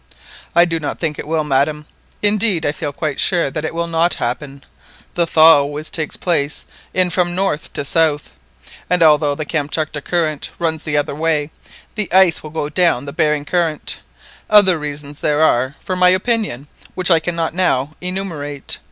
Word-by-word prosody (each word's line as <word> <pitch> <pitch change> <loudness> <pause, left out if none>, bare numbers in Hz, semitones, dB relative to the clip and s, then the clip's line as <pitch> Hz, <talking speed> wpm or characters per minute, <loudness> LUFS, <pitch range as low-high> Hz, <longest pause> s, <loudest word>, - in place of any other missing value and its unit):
"I 175 - +6
do 165 -1 -2
not 150 - -4
think 155 -3 -2
it - - -6
will, 160 0 0
madam; 150 +2 0 0.4
indeed 205 -4 +2
I 145 - +2
feel 145 -1 -4
quite 150 0 -3
sure 170 -6 +2
that 155 - -3
that 155 - -3
will 170 0 -1
not 170 +1 +1
happen. 135 +3 -4 0.5
The 170 -1 +1
thaw 160 -1 +7
always 145 +2 -4
takes 160 -3 -3
place 150 -5 -1 0.3
in 185 -1 +1
from 175 -1 +1
north 185 -5 -1
to 145 - -3
south, 155 -1 +1 0.6
and 180 -2 +3
although 150 -2 +4
the 155 - -4
Kamtchatka 155 0 -2
Current 155 -1 -1
runs 160 -2 -2
the 150 -2 0
other 145 -1 0
way, 155 0 0 0.4
the 210 -3 -4
ice 185 -2 +5
always 155 0 -10
goes 150 -2 -2
down 165 -6 +2
the 140 - -6
Behring 150 -1 +1
Current. 165 -2 -1 0.5
Other 190 -5 +5
reasons 145 -1 -6
there 150 +1 +1
are 130 -1 +2
for 185 - -4
my 180 0 +5
opinion 185 - -1 0.3
which 185 0 +1
I 165 - +6
cannot 165 -1 -2
now 150 -6 +1
enumerate. 170 -7 -4
160 Hz, 180 wpm, -18 LUFS, 145-175 Hz, 0.6 s, thaw